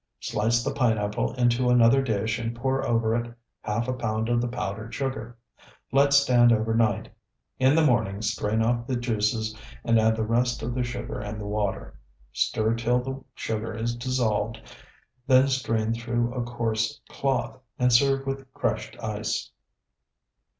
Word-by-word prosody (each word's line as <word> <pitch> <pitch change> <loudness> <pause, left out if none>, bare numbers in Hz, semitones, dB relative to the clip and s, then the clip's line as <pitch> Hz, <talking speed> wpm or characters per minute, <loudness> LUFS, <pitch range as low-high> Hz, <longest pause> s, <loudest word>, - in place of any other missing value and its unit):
Slice 115 +3 0
the 140 - -2
pineapple 110 -5 0
into 125 0 +2
another 125 +2 +5
dish 110 -2 -1
and 115 0 -3
pour 130 +3 -1
over 115 -1 +1
it 120 0 -2 0.3
half 110 +3 -2
a 130 - 0
pound 110 -2 -2
of 120 0 +2
the 120 - -1
powdered 110 -1 -5
sugar. 120 -4 -4 0.5
Let 140 +1 +4
stand 125 -4 +5
overnight. 110 -1 +1 0.5
In 130 +2 +4
the 160 -1 +4
morning 110 -6 +1
strain 110 0 0
off 120 +1 0
the 130 - -1
juices 110 -2 -1 0.3
and 115 -1 +3
add 110 0 +3
the 110 - -1
rest 120 +2 0
of 120 - -2
the 125 - -1
sugar 120 0 -4
and 105 0 -5
the 105 - -6
water. 105 -1 -3 0.3
Stir 110 +1 +1
till 115 +2 +1
the 135 0 -6
sugar 110 0 -3
is 115 +1 -2
dissolved, 115 -3 -1 0.7
then 130 0 +6
strain 115 -4 0
through 120 +1 -1
a 125 - -2
coarse 115 -2 -2
cloth, 135 -1 -2 0.2
and 125 -1 +3
serve 135 +2 +4
with 135 -1 -5
crushed - - -2
ice. - - -3
120 Hz, 155 wpm, -26 LUFS, 110-125 Hz, 0.7 s, then